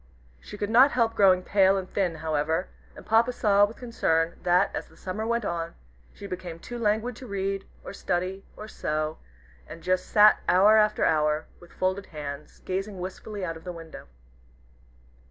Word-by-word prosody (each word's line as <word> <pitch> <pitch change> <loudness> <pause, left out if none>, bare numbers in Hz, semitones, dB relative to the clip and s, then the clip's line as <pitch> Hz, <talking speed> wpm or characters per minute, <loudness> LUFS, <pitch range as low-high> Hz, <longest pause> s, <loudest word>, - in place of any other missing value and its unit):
She 210 - -10
could 205 +1 -3
not 260 +5 +6
help 230 -2 +2
growing 185 -4 +4
pale 195 0 +3
and 190 -1 -4
thin 185 -4 -1
however, 160 +2 -1 0.3
and - - -12
Papa 230 +3 +3
saw 205 -4 +4
with 215 +3 -9
concern 165 -9 0
that, 180 +2 +2
as - - -4
the - - -21
summer 210 +4 -4
went 235 -1 0
on, 170 -1 -3 0.4
she - - -11
became 180 -3 -6
too 240 +8 -8
languid 220 +2 0
to 255 - -10
read, 195 -1 -3 0.2
or - - -8
study, 185 +1 -2
or 215 - -8
sew, 155 -5 -3 0.5
and 165 +1 -11
just 185 0 0
sat 210 0 +6
hour 200 +4 +6
after 210 0 +3
hour, 150 0 +1
with 175 - -17
folded 185 +1 -2
hands, 145 -1 -8
gazing 195 +2 -3
wistfully 190 +2 -6
out 165 -2 -4
of 160 - -15
the 180 - -5
window. 165 -2 -11
190 Hz, 175 wpm, -26 LUFS, 170-210 Hz, 0.5 s, not